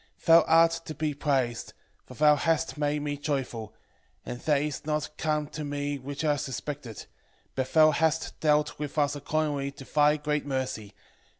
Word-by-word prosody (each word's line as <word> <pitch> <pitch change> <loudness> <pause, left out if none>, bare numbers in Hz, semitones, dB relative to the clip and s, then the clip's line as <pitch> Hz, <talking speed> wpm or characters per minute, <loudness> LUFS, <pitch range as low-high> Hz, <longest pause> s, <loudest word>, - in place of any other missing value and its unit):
8:16 - - -23
Thou 165 0 +8
art 165 +1 +6
to 155 - -6
be 155 +1 -1
praised, 135 -5 -1 0.3
for 130 - -11
thou 150 +1 +5
hast 165 +2 0
made 145 0 -1
me 145 -1 -3
joyful; 125 -7 -3 0.5
and 120 - -6
that 150 0 +2
is 150 -3 -4
not 150 0 -2
come 150 -1 -1
to 155 - -6
me 145 0 -3
which 140 +4 -5
I 145 -1 +2
suspected; 135 -4 -6 0.5
but 130 -1 -3
thou 155 -1 +6
hast 160 +1 0
dealt 150 -1 +1
with 150 +1 -5
us 145 -1 +2
according 145 -1 -2
to 140 0 -11
thy 150 +1 +3
great 150 0 -1
mercy. 130 -7 -4
145 Hz, 175 wpm, -28 LUFS, 140-155 Hz, 0.5 s, Thou